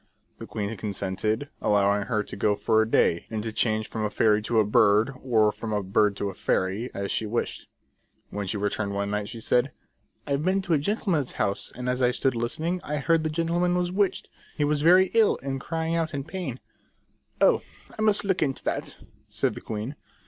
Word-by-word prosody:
The - - -8
queen 105 +1 -3
consented, 105 +5 -2
allowing 100 0 +2
her 110 -4 0
to - - -8
go 105 +1 +1
for 110 +2 +2
a 110 - 0
day, 85 -6 +2
and 110 -2 -3
to 110 -1 -4
change 110 -1 +1
from 110 - -4
a 105 - 0
fairy 105 0 +3
to 110 +1 +1
a 110 - +4
bird, 105 +4 +4
or 110 -5 +3
from 110 +1 -6
a 105 -1 0
bird 100 +2 +2
to 100 0 -2
a - - -12
fairy, 95 +7 -1
as 100 0 -4
she 110 - -1
wished. 115 +3 -3 0.6
When 100 -1 -4
she 105 - -1
returned 100 0 -2
one 100 0 -1
night 105 0 -2
she 115 - -7
said: 125 +4 +1 0.3
" - - -43
I've 140 +1 -1
been 190 +2 +1
to 180 - 0
a 150 - +3
gentleman's 170 - 0
house, 100 - -1
and 125 +1 -5
as 125 +1 0
I 125 - +4
stood 130 +1 0
listening, 155 +10 -2
I 150 - -3
heard 165 +2 +2
the 155 - 0
gentleman 170 +3 +1
was 180 0 0
witched: 195 +1 0 0.3
he 150 - +1
was 145 0 +1
very 180 +4 +5
ill, 225 -2 +4
and 135 -1 -3
crying 165 +1 -2
out 165 -2 -1
with 140 -1 -3
pain." 160 -7 -5 0.4
" - - -42
Oh, - - +4 0.3
I - - -5
must 215 -1 +3
look 190 -2 0
into 135 -3 -1
that," - - -3 0.3
said - - -1
the - - -8
queen. 110 +6 -5
120 Hz, 215 wpm, -26 LUFS, 105-160 Hz, 0.6 s, very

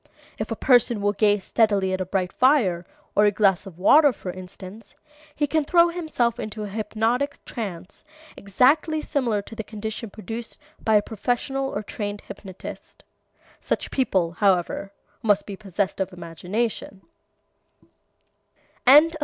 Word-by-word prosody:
If - - -3
a - - -2
person 240 -3 +3
will 205 0 +1
gaze 205 -1 +2
steadily 200 -4 +2
at 185 - -1
a 185 - -3
bright 185 -1 -1
fire, 210 - +3 0.3
or 210 - +5
a 205 - +5
glass 195 -3 +2
of 175 -4 -11
water, 290 - +6
for 190 -5 -7
instance, 185 +3 -11 0.4
he 295 - +1
can 310 +1 +1
throw 340 +3 +4
himself 310 -9 -1
into 215 0 -5
a 205 - -5
hypnotic 225 +6 -1
trance 195 -5 -7 0.3
exactly 290 - +2
similar 240 -10 -1
to 225 - -11
the 220 - -4
condition 220 +2 -6
produced 225 +3 -7 0.3
by 220 - +3
a 205 - +4
professional 245 +5 -2
or 205 - -4
trained 205 -1 -5
hypnotist. 190 -2 -10 0.6
Such - - -3
people, 190 -10 +1
however, 195 +1 +1 0.3
must 205 -3 +2
be 200 - -6
possessed 195 -1 -3
of 190 0 -1
imagination. 185 +4 -4
210 Hz, 140 wpm, -24 LUFS, 195-240 Hz, 0.6 s, water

